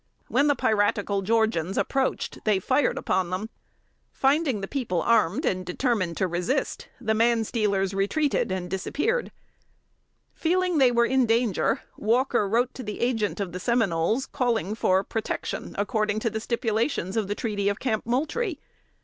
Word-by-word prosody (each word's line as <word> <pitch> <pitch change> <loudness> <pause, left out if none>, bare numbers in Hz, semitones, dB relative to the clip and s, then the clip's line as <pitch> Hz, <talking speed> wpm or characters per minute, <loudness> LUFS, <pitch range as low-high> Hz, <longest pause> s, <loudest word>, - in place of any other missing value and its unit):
When 280 +4 +3
the 290 - +3
piratical 205 -4 +1
Georgians 205 -4 +1
approached, 270 -1 -1
they 210 -3 +3
fired 260 +9 +1
upon 185 -2 0
them. 195 +5 -4 0.6
Finding 275 -5 +1
the 195 - -4
people 230 -10 -2
armed 230 - +2
and 185 -1 0
determined 185 - -1
to 190 - +1
resist, 180 +11 -2
the 220 -3 0
manstealers 220 -4 +1
retreated 205 +5 0
and 185 -1 -2
disappeared. 295 - -1 1.0
Feeling 360 0 +1
they 260 -2 +5
were 235 0 +3
in 260 0 +2
danger, 225 -3 +1 0.2
Walker 235 -1 +1
wrote 240 +4 +1
the 210 -5 -6
Agent 225 -5 0
of 195 -3 -3
the 180 - -5
Seminoles, 220 0 +1
calling 235 - -1
for 190 -3 +2
protection, 220 +2 -4
according 210 +1 0
to 230 - 0
the 220 - -2
stipulations 225 - -1
of 220 -3 0
the 205 - -2
treaty 205 -4 -1
of 205 - -2
Camp 220 -5 -1
Moultrie. 310 - -1
220 Hz, 150 wpm, -26 LUFS, 195-255 Hz, 1.0 s, they